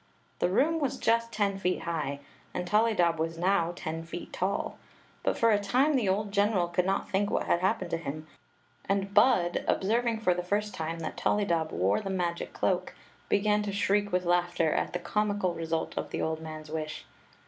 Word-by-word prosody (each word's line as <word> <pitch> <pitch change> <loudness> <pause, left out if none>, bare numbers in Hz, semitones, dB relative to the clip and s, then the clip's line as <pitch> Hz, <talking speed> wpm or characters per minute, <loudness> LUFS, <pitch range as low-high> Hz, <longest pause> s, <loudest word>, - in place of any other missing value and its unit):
The - - +2
room 310 - +2
was 280 -4 -1
just 230 +1 +1
ten 200 -3 0
feet 180 -1 0
high, 150 -4 -3 0.3
and 180 - -2
Tollydob 185 -5 +2
was 165 +1 -2
now 175 -1 +2
ten 160 -2 -4
feet 170 +1 -8
tall; 190 +2 -2 0.4
but - - 0
for 230 -1 +4
a 205 - +4
time 255 +9 +2
the 230 -7 +2
old 200 +2 0
general 200 -3 +2
could 180 +1 0
not 195 +1 0
think 200 +1 +1
what - - 0
had 170 - +2
happened 185 -1 0
to 165 - +1
him, 155 -1 -6 0.6
and 195 0 0
Bud, 205 -5 +4
observing 230 +3 +1
for 180 -4 +3
the 180 - -2
first 205 +3 -1
time 165 -1 -3
that 160 - -5
ToUydob 170 -6 +1
wore 95 - +1
the 195 - -5
m^c 175 -3 -2
cloak, - - -1 0.3
began 210 +1 +3
to 205 -1 -3
shriek 205 +1 +1
with 180 0 +1
laughter 175 -2 +2
at - - -1
the - - 0
comical 205 0 0
result 165 -1 -3
of - - -3
the - - -4
old 160 0 -2
man's 155 -1 -8
wish. 155 -1 -4
185 Hz, 190 wpm, -29 LUFS, 165-210 Hz, 0.6 s, for